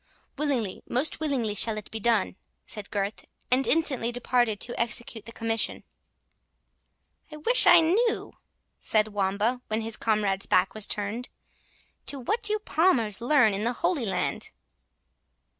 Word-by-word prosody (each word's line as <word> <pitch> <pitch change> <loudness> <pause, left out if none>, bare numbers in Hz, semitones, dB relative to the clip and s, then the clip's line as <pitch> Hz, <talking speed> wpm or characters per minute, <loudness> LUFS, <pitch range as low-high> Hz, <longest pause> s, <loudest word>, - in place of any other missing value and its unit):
"Willingly, 270 -9 -2
most 270 +7 0
willingly 270 -9 -1
shall 215 +1 +3
it 210 - -9
be 220 - -4
done," 220 -3 +1 0.3
said 210 -2 -7
Gurth, 205 0 -3 0.3
and 260 +1 +2
instantly 270 -7 +1
departed 240 -3 0
to 240 - -3
execute 235 -2 -3
the - - -8
commission. 225 0 -2 1.5
"I 305 - -8
wish 475 +12 +6
I 350 -1 +8
knew," 430 +8 +1 0.5
said 215 0 +1
Wamba, 205 +4 -1
when 220 +1 -1
his 225 0 -2
comrade's 205 -3 0
back 185 +1 +2
was 215 -1 -3
turned, 210 +4 -3 0.8
"what 420 - -2
you 425 - +1
Palmers 285 - +1
learn 245 -4 +4
in 200 +2 -2
the 240 +2 0
Holy 320 -4 -1
Land." 195 - -2
235 Hz, 140 wpm, -26 LUFS, 215-285 Hz, 1.5 s, I